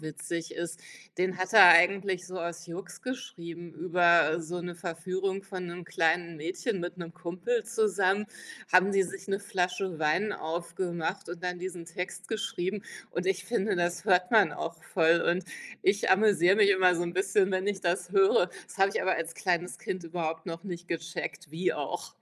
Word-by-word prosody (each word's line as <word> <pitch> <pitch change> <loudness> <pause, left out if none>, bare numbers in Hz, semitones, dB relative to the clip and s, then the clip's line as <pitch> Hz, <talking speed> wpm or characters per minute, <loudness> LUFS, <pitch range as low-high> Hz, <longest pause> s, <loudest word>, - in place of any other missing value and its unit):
witzig 160 +2 -5
ist. 170 -1 -5 0.4
Den 185 0 0
hat 185 0 -3
er 210 -5 +10
eigentlich 180 +1 +5
so 185 -1 -6
aus 170 0 -5
Jux 175 +2 -8
geschrieben, 170 -9 -7
über 170 -1 +3
so 175 +2 -5
'ne 175 0 -5
Verführung 185 +3 -3
von 185 -2 -6
'nem 175 0 -7
kleinen 165 +2 0
Mädchen 180 - -3
mit 175 +1 -5
'nem 170 -2 -7
Kumpel 185 +7 -2
zusammen 210 -3 +1 0.5
haben 185 +2 +6
die 195 - +4
sich 195 +2 -8
'ne 195 - 0
Flasche 185 -3 -2
Wein 160 +8 +1
aufgemacht 170 +2 -4
und 175 +1 -7
dann 180 0 -2
diesen 180 -1 -6
Text 180 +2 -6
geschrieben 200 -3 -3 0.3
und 180 +2 -3
ich 190 -1 0
finde, 215 -5 0
das 175 +3 -1
hört 180 -1 +3
man 205 -9 +5
auch 165 +1 -6
voll 170 -1 +3
und 175 +1 +1 0.4
ich 200 +2 +2
amüsiere 195 -2 +5
mich 205 -2 +5
immer 185 -2 +5
so 170 - -1
'n 170 0 -3
bisschen, 190 +1 +2
wenn 190 0 -1
ich 205 -2 -2
das 180 +1 -1
höre. 195 -2 +4 0.2
Das - - -13
habe 195 +1 +4
ich - - 0
aber 190 - +2
als 165 0 -4
kleines 180 -1 -1
Kind 185 -2 -5
überhaupt 165 -1 -4
noch 165 +1 -6
nicht 175 -2 -7
gecheckt. 165 0 -5
Wie 170 +4 0
auch? - - -5
180 Hz, 180 wpm, -29 LUFS, 170-190 Hz, 0.5 s, er